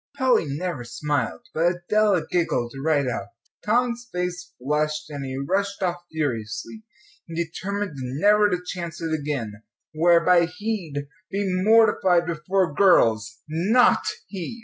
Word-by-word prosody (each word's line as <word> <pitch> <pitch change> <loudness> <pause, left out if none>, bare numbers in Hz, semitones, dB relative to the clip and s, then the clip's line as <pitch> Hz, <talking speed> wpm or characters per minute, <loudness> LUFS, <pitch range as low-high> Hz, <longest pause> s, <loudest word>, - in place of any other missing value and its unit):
Polly 260 - +3
never 145 -1 -3
smiled, 145 - -2
but 170 +2 +2
Adela 210 -5 +3
giggled 150 -9 -1
right 145 -4 +2
out. 110 -5 -3 0.4
Tom's 240 +2 0
face 180 0 -4
flushed, 150 +3 -1
and 140 -1 -5
he 130 0 -5
rushed 195 +8 -1
off 175 -1 0
furiously, 145 - -3 0.5
determined 185 +4 -3 0.3
never 210 +2 +5
to 180 - +1
chance 170 -2 -5
it 165 -1 -3
again 140 -9 -3 0.3
whereby 170 +2 +4
he'd 180 -6 -4 0.2
be 200 0 -1 0.2
mortified 210 -5 +4
before 170 +1 0
girls 115 - +3
not 190 +11 +3 0.2
he! 195 +4 -6
170 Hz, 125 wpm, -24 LUFS, 150-200 Hz, 0.5 s, never